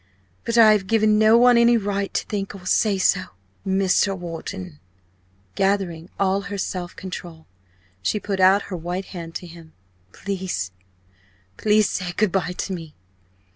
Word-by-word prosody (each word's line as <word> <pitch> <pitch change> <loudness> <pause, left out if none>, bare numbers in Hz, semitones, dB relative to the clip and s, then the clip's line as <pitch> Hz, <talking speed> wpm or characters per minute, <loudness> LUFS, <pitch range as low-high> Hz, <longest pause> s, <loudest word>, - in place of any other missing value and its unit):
But 230 0 -1
I 220 -2 +8
have 205 -3 +1
given 215 -1 +3
no 220 +1 +6
one 245 0 +6
any 235 0 +5
right 200 -2 -2
to - - 0
think 200 -1 -4
so - - -8
or 180 - -16
say 200 +1 +2
so. 185 0 +2 0.4
Mr. 195 0 +1
Wharton 125 - -7 0.4
" 90 -1 -39 0.3
Gathering 190 -4 -1
all 195 0 +2
her 200 +1 -6
self 180 -2 -4
control, 175 -3 -8 0.6
she 210 - 0
put 200 -2 -3
out 190 +2 +5
her - - -1
white 175 +3 -4
hand 165 -2 -8
to - - -5
him. 165 -2 -13 0.4
"Please 185 - -4 0.8
please 210 - +3
say 180 -1 -3
good 205 +1 +1
bye 180 -2 -1
to 190 - -4
me. 165 -4 -8
190 Hz, 165 wpm, -22 LUFS, 175-205 Hz, 0.8 s, I